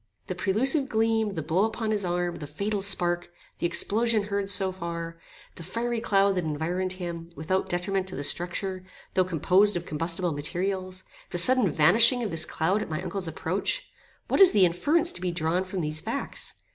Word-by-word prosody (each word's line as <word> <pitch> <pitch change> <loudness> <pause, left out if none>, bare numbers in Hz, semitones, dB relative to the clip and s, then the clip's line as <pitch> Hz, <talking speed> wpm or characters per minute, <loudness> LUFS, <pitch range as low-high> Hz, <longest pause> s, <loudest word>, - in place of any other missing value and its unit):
The - - -4
prelusive 265 +8 +2
gleam, 220 -2 +1
the 160 - -3
blow 165 +6 +1
upon 220 0 -1
his 210 -2 +1
arm, 175 -1 -1
the 150 - -7
fatal 200 +7 -2
spark, 175 -3 0 0.3
the 175 - +1
explosion 220 +5 +1
heard 200 -1 -2
so 195 -1 +2
far, 170 -2 -6 0.4
the - - -9
fiery 235 +7 -2
cloud 200 -3 +3
that 180 -2 -1
environed 170 +5 -2
him, 170 -2 -6
without 185 +6 -1
detriment 190 +1 -1
to 185 - -4
the 145 - -4
structure, 185 +4 -1 0.3
though 185 - +3
composed 185 +4 +3
of 170 - -6
combustible 165 +3 -2
materials, 185 +5 -3 0.3
the - - -4
sudden 250 +3 +5
vanishing 225 - +5
of 210 - -3
this 165 0 0
cloud 185 +6 0
at 215 - -5
my 155 -1 -2
uncle's 185 0 -4
approach 190 - -3 0.4
what - - +2
is 380 - +9
the 195 -3 +6
inference 300 - +2
to - - -8
be 185 - -1
drawn 170 +1 0
from 185 -1 -4
these 155 0 -3
facts? - - -4
185 Hz, 185 wpm, -27 LUFS, 170-205 Hz, 0.4 s, is